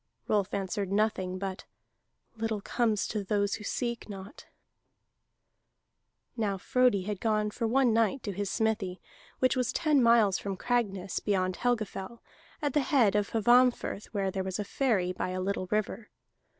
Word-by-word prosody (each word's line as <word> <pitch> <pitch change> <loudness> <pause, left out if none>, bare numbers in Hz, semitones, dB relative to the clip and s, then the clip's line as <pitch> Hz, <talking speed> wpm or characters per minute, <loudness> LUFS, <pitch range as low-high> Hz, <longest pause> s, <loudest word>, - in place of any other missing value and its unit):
Rolf 205 -3 +1
answered 195 0 -2
nothing 200 -3 0
but: 190 0 -5 0.7
"Little 225 -1 -2
comes 215 0 0
to 210 -2 -3
those 200 0 0
who - - -4
seek 235 +2 -3
not." 195 0 -9 1.9
Now 210 -4 -1
Frodi 245 -1 +2
had 205 -1 -4
gone 215 -2 +1
for 230 +1 -2
one 250 0 +3
night 230 +3 +1
to 205 - -3
his 200 +1 -3
smithy, 210 -5 -1 0.4
which 255 0 +2
was 250 -2 0
ten 305 -5 +2
miles 230 -5 +4
from 195 -2 -4
Cragness, 200 -5 -1
beyond 185 -3 0
Helgafell, 230 -2 -2 0.4
at 290 -3 0
the 295 - +3
head 265 - +3
of 205 -1 +1
Hvammfirth, 240 -1 +3
where 195 -3 -2
there 190 0 -2
was 190 -1 -3
a 210 - -2
ferry 200 -8 +1
by 185 - -3
a 185 0 -3
little 185 0 -2
river. 210 +1 -2
210 Hz, 155 wpm, -29 LUFS, 195-235 Hz, 1.9 s, miles